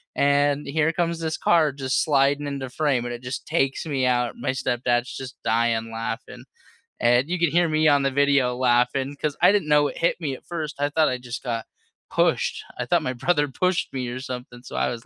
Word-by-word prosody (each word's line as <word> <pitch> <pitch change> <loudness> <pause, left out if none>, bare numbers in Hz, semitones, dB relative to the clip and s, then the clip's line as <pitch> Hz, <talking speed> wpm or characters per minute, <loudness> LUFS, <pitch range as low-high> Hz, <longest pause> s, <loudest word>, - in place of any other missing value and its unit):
and 145 0 +2
here 160 +2 +1
comes 170 -1 -1
this 160 -1 -2
car 160 -4 +3
just 130 -2 -1
sliding 145 0 +2
into 135 -2 -4
frame, 135 -3 0
and 120 - -4
it 120 - -12
just 125 +1 -5
takes 135 -4 0
me 135 -3 0
out 125 -1 +1
and - - -14
my - - 0
stepdad's 120 -1 -1
just 130 -1 -7
dying 115 0 +1
laughing 115 0 -5 0.6
and 120 +5 +3
you 180 - 0
could 170 -2 +2
hear 175 0 +3
me 155 0 +2
on 145 -1 +4
the 135 - +2
video 140 -2 +2
laughing 130 +2 +1
'cause 150 -2 -1
I - - +7
didn't 200 -7 +1
know 150 -1 +4
it - - -9
hit 170 - +1
me 145 -5 -2
at - - -16
first, 160 -3 -4
I 145 - +1
thought 155 +1 +2
I 125 - -2
just 125 0 -7
got 115 -3 -3 0.4
pushed, - - +1 0.2
I - - -1
thought - - +2
my 130 - -2
brother 145 +3 +1
pushed 180 +6 -1
me 130 -2 -3
or 120 +1 -5
something, 125 -2 -8
so, - - -9
I - - +1
was 115 -1 -6
135 Hz, 225 wpm, -24 LUFS, 125-150 Hz, 0.6 s, I